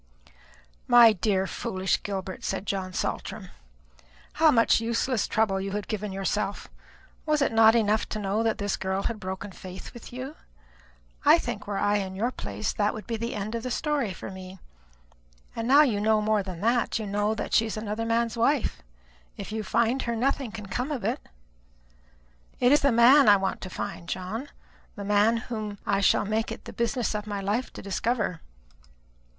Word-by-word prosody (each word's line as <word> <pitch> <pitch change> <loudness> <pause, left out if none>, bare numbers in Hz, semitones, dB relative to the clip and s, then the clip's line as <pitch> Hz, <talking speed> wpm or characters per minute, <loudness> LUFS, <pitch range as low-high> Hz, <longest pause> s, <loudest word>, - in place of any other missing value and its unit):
"My 235 -2 +8
dear 190 -1 0
foolish 190 0 -1
Gilbert," 190 -2 -5
said 195 - -3
John 190 -2 -2
Saltram, - - -4 0.8
"how 320 0 +5
much 230 -4 +4
useless 230 0 0
trouble 195 -3 +1
you 195 0 -4
have 205 -1 -3
given 210 -2 -3
yourself! 195 +1 -2 0.6
Was 305 -1 +2
it 280 - +2
not 225 0 +6
enough 215 -1 +2
to - - -3
know 205 +2 0
that 225 -1 +1
this 205 0 -1
girl 190 +1 -2
had 230 -2 -2
broken 190 +1 -5
faith 185 0 -10
with 240 - -11
you? 260 +5 -7 0.9
I - - +7
think, - - -5
were 205 -1 -2
I 205 +1 +2
in 190 -2 -4
your 230 +6 0
place, 105 - -4
that 210 0 0
would 215 - -8
be 230 - -3
the 230 +1 -4
end 210 +1 -4
of 230 - -2
the 255 - -4
story 280 -3 -1
for 185 - -8
me. 190 0 -9 1.0
And 230 0 -3
now 285 +4 +7
you 220 -8 0
know 220 0 +3
more 215 0 +1
than 185 -3 -7
that 235 +2 +1
you 220 - -4
know 205 +2 0
that - - -5
she 225 - +4
is 220 - -5
another 215 +1 -3
man's 230 0 +1
wife. 235 - +1 0.6
If - - -7
you 220 0 -2
find 235 +5 +1
her, 235 -1 -2
nothing 260 0 0
can 210 -1 -7
come 250 +9 -3
of 260 -8 -3
it." 230 +5 -1 1.4
"It 245 +1 +4
is 295 - +5
the 280 - +3
man 240 +2 +7
I 205 - +8
want 190 -1 -2
to 185 - -6
find, 170 -1 -6
John; 215 +10 -4 0.5
the 200 - -6
man 210 +3 +3
whom 215 -3 -5
I 200 0 +1
shall - - +3
make 220 +2 -1
it - - -8
the - - -8
business 235 0 -1
of 210 0 -4
my 205 -1 -3
life 205 +6 -1
to - - -9
discover." 200 -3 -1
215 Hz, 190 wpm, -27 LUFS, 195-235 Hz, 1.4 s, My